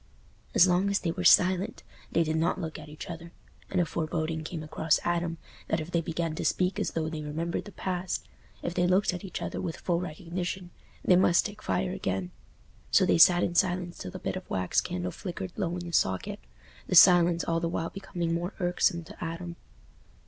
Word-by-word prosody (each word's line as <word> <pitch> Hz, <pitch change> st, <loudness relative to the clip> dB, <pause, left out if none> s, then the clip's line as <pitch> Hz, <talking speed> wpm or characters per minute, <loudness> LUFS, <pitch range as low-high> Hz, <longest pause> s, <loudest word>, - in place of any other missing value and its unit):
As 175 Hz, -, +8 dB
long 185 Hz, +2 st, +2 dB
as 200 Hz, -, +2 dB
they 170 Hz, -, -1 dB
were 180 Hz, -, -4 dB
silent 185 Hz, +2 st, +4 dB, 0.3 s
they 170 Hz, -, +3 dB
did 155 Hz, 0 st, -1 dB
not 165 Hz, +3 st, +1 dB
look 160 Hz, -3 st, -5 dB
at 150 Hz, 0 st, -11 dB
each 150 Hz, -, -9 dB
other, 170 Hz, 0 st, -8 dB, 0.4 s
and 185 Hz, -, 0 dB
a 175 Hz, -, +3 dB
foreboding 160 Hz, 0 st, -2 dB
came 160 Hz, 0 st, -5 dB
across 155 Hz, +1 st, +1 dB
Adam 170 Hz, -1 st, -1 dB, 0.3 s
that 160 Hz, -, 0 dB
if 160 Hz, +2 st, -6 dB
they 170 Hz, -, +2 dB
began 165 Hz, 0 st, -2 dB
to -, -, -4 dB
speak 180 Hz, +1 st, +1 dB
as -, -, -1 dB
though 160 Hz, -1 st, -1 dB
they 160 Hz, -1 st, -4 dB
remembered 160 Hz, +3 st, -3 dB
the 205 Hz, -, -9 dB
past—if 180 Hz, -2 st, -5 dB
they 180 Hz, 0 st, +2 dB
looked 185 Hz, +1 st, +3 dB
at 180 Hz, -, -6 dB
each 190 Hz, -, -5 dB
other -, -, -4 dB
with 165 Hz, -3 st, -4 dB
full 170 Hz, -2 st, 0 dB
recognition—they 180 Hz, +2 st, -3 dB
must 175 Hz, -1 st, +4 dB
take 210 Hz, 0 st, -6 dB
fire 185 Hz, -2 st, -1 dB
again. 95 Hz, -, -3 dB, 0.6 s
So -, -, +5 dB
they -, -, +3 dB
sat 175 Hz, +1 st, +7 dB
in 175 Hz, -, 0 dB
silence 180 Hz, -1 st, 0 dB
till -, -, -5 dB
the -, -, -7 dB
bit -, -, -3 dB
of -, -, -7 dB
wax 90 Hz, -1 st, +1 dB
candle 90 Hz, 0 st, -3 dB
flickered 180 Hz, -, -6 dB
low 180 Hz, -5 st, -1 dB
in 175 Hz, -, -6 dB
the 170 Hz, -, -6 dB
socket, 95 Hz, -, 0 dB, 0.5 s
the -, -, 0 dB
silence 175 Hz, -1 st, +7 dB
all 165 Hz, 0 st, 0 dB
the 165 Hz, 0 st, -1 dB
while 165 Hz, 0 st, -3 dB
becoming 175 Hz, -4 st, -3 dB
more 175 Hz, +3 st, -3 dB
irksome 175 Hz, -1 st, +1 dB
to 160 Hz, -, -10 dB
Adam. 170 Hz, +1 st, -5 dB
170 Hz, 205 wpm, -28 LUFS, 160-180 Hz, 0.6 s, As